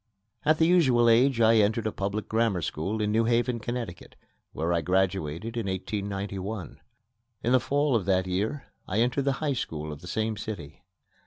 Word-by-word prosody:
At 155 +1 +3
the 160 - +4
usual 135 -9 +4
age, 120 +2 +4
I 115 0 +6
entered 110 +1 +2
a 110 - 0
public 100 +2 -3
grammar 110 -6 +1
school 95 +9 -2
in 105 - 0
New 115 +1 +2
Haven, 120 +1 +1
Connecticut, 115 -6 -6 0.4
where 80 +3 -1
I 85 - +1
graduated 95 +3 -1
in 115 -4 -2
1891. 100 0 -4 0.6
In 120 - +1
the 130 - +6
fall 140 +2 +1
of 105 -6 0
that 95 -1 +2
year 105 +10 -2 0.2
I 95 - -2
entered 125 +4 +1
the 140 - +2
High 145 +1 -1
School 75 - -4
of 75 - -11
the 90 - -10
same 110 +3 -1
city. 90 -8 -7
110 Hz, 180 wpm, -27 LUFS, 95-120 Hz, 0.6 s, I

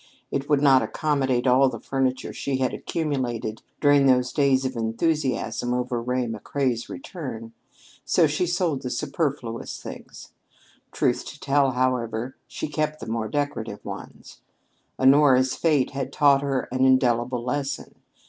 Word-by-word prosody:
It 140 +1 -2
would 145 -1 +3
not 135 -2 +6
accommodate 135 -5 0
all 130 +1 +5
of 130 - +2
the 115 - -5
furniture 130 -1 -1
she 135 -1 -2
had 130 -1 0
accumulated 125 -8 -3 0.2
during 145 -2 +5
those 125 -1 +3
days 135 -2 +3
of 130 0 -2
enthusiasm 125 +1 -1
over 125 -1 -2
Ray 125 +1 -1
McCrea's 120 +2 -2
return, 120 -8 -7 0.5
so 170 - +3
she 150 +4 0
sold 175 -5 0
the 125 - -4
superfluous 135 -3 -3
things. - - -10 0.6
Truth - - 0
to - - -9
tell, 135 -1 +2
however, 125 -1 -1
she - - -5
kept 155 +1 -2
the - - -7
more 110 -1 -2
decorative 145 -7 -3
ones. - - -9 0.6
Honora's 130 -1 +5
fate 150 -6 +2
had 135 -1 -4
taught 140 -1 +4
her 135 -2 -1
an 130 +1 +1
indelible 125 -2 +2
lesson. 140 +2 -3
130 Hz, 145 wpm, -24 LUFS, 125-145 Hz, 0.6 s, not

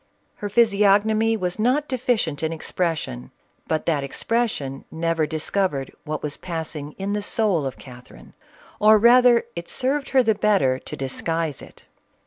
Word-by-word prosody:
Her 205 - -4
physiognomy 215 +1 +3
was 180 0 -3
not 260 +7 +1
deficient 235 - -1
in 160 0 -1
expression; 160 - -3 0.4
but 155 -1 -1
that 150 -4 0
expression 140 - -2
never 165 -1 -1
discovered 155 -2 -2
what 155 0 -4
was 150 -1 -3
passing 160 -4 -5
in 195 +1 -4
the 210 - -1
soul 200 -8 0
of 130 - -7
Catherine, 125 - -14 0.5
or 215 +1 +6
rather 240 +2 +6
it 170 0 -7
served 270 +2 -1
her 265 -1 +4
the 220 -2 +3
better 195 -12 +2
to - - -8
disguise 155 +2 -3
it." - - -15
180 Hz, 145 wpm, -23 LUFS, 150-220 Hz, 0.5 s, or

